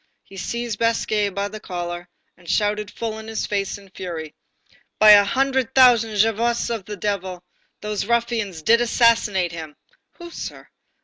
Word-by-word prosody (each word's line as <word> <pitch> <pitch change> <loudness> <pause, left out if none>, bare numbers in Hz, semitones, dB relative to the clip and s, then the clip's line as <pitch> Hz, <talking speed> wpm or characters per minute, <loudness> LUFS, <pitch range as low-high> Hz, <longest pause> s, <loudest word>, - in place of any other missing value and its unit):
He 195 - -16
seized 235 +2 -4
Basque 230 -1 0 0.2
by 200 0 -1
the 215 +1 -8
collar, 175 -2 -6 0.3
and 175 -1 -15
shouted 210 0 0
full 220 0 -5
in 220 - -10
his 225 0 -3
face 200 0 -2
in 200 -2 -17
fury:—"By 175 +4 -1
the 205 0 +8
hundred 265 +3 0
thousand 235 -4 +5
Javottes 225 +3 +1
of 215 -5 -5
the 210 0 -7
devil, 185 -2 -3 0.4
those 210 -1 -3
ruffians 230 -7 -1
did 230 +7 +4
assassinate 225 -6 +2
him!" 160 -3 -8 0.4
"Who, 345 -1 -11
sir?" - - -8
210 Hz, 150 wpm, -22 LUFS, 190-230 Hz, 0.4 s, the